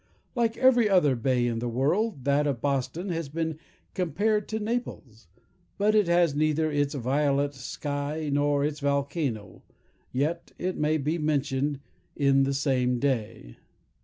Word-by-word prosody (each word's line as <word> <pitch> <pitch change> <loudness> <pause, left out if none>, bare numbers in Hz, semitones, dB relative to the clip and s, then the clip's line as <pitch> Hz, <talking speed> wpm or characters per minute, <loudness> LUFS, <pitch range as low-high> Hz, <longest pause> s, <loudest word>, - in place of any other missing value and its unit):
Like 235 -2 0
every 245 -4 +4
other 175 -9 +4
bay 125 +1 +1
in 115 -1 -1
the 120 +1 -2
world, 145 - 0
that 140 +2 +2
of 135 -4 -1
Boston 145 +8 -2
has 165 -4 -3
been 160 0 -3 0.3
compared 205 +4 0
to 220 - -3
Naples; 210 - -5 0.5
but 210 +1 +2
it 210 -4 +3
has 170 -3 +3
neither 155 +1 +1
its 145 0 0
violet 140 +2 +1
sky, 145 +3 -4
nor 145 0 +2
its 150 0 -3
volcano, 140 - -2 0.5
yet 155 +6 -2
it 185 +1 -2
may 150 +1 +1
be 155 +4 -1
mentioned 145 -2 -1 0.3
in 135 -1 +3
the 140 - 0
same 130 -3 +1
day. 115 - -2
145 Hz, 145 wpm, -27 LUFS, 135-165 Hz, 0.5 s, every